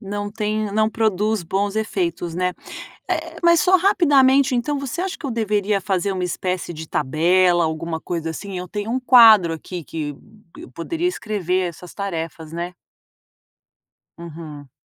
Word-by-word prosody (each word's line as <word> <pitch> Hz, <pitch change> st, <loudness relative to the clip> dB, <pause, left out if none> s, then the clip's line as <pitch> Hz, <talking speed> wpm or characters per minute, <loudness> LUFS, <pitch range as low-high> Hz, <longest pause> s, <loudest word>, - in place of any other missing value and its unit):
Não 205 Hz, -1 st, -4 dB
tem 215 Hz, -1 st, -2 dB
não 215 Hz, 0 st, +2 dB
produz 215 Hz, -2 st, 0 dB
bons 195 Hz, +4 st, -1 dB
efeitos, 175 Hz, -6 st, -2 dB
né. 180 Hz, 0 st, -1 dB, 0.6 s
Eh, -, -, -3 dB
mas 340 Hz, -1 st, +5 dB
só 375 Hz, 0 st, +5 dB
rapidamente, 280 Hz, -9 st, +4 dB
então 285 Hz, +5 st, -1 dB
você 280 Hz, +5 st, -4 dB
acha 380 Hz, 0 st, -3 dB
que -, -, -8 dB
eu 270 Hz, -, -2 dB
deveria 210 Hz, -3 st, 0 dB
fazer 190 Hz, 0 st, -1 dB
uma 185 Hz, -1 st, -2 dB
espécie 180 Hz, 0 st, -3 dB
de 160 Hz, 0 st, -8 dB
tabela, 175 Hz, +5 st, +2 dB
alguma 160 Hz, +1 st, -3 dB
coisa 165 Hz, -1 st, -4 dB
assim? 195 Hz, +3 st, -7 dB
Eu 180 Hz, 0 st, -5 dB
tenho 210 Hz, +3 st, -4 dB
um 255 Hz, -, 0 dB
quadro 225 Hz, -9 st, +7 dB
aqui 170 Hz, +1 st, -7 dB
que 145 Hz, -1 st, -5 dB, 0.4 s
eu -, -, -10 dB
poderia 330 Hz, -, -2 dB
escrever 195 Hz, -, -1 dB
essas 175 Hz, +1 st, -12 dB
tarefas, 165 Hz, -5 st, -5 dB
né. 175 Hz, +1 st, -4 dB, 1.5 s
Uhum. 155 Hz, -4 st, -10 dB
195 Hz, 155 wpm, -21 LUFS, 170-220 Hz, 1.5 s, quadro